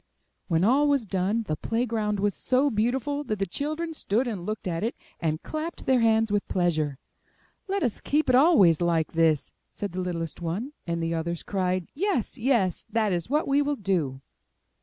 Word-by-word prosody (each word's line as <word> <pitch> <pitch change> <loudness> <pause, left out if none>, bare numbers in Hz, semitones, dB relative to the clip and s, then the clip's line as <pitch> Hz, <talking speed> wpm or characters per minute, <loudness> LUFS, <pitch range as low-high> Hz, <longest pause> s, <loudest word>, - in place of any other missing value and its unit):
When 165 -1 +2
all 270 +8 +4
was 280 -5 +2
done 195 +4 0
the 155 -7 -2
play 230 +9 -1
ground 215 -3 -1
was 205 0 +1
so 265 +2 +1
beautiful 260 +6 0
that 215 -4 -2
the 195 - 0
children 310 - -3
stood 245 -3 0
and 195 -7 -4
looked 215 -2 -3
at 165 +1 -2
it, 230 - -1 0.2
and 155 -1 -1
clapped 315 +2 -5
their 260 -1 +4
hands 225 -1 +3
with 205 -1 0
pleasure. 155 -6 0 0.7
*'Let 395 -2 -1
us 240 -6 -1
keep 300 +2 +1
it 255 - +3
always 250 - +6
like 170 -2 +1
this!*' 160 -3 +2 0.2
said 205 - -5
the 185 +1 -3
littlest 170 -2 -4
one; 195 - -3
and 170 0 -1
the 165 0 -1
others 165 +1 -3
cried, 185 -2 -1
Yes! 365 - -1
yes! 225 -8 +1
that 215 -4 +1
is 175 +3 -2
what 300 +3 +1
we 280 +1 +3
will 290 0 0
do." 170 - -1
210 Hz, 190 wpm, -26 LUFS, 175-265 Hz, 0.7 s, always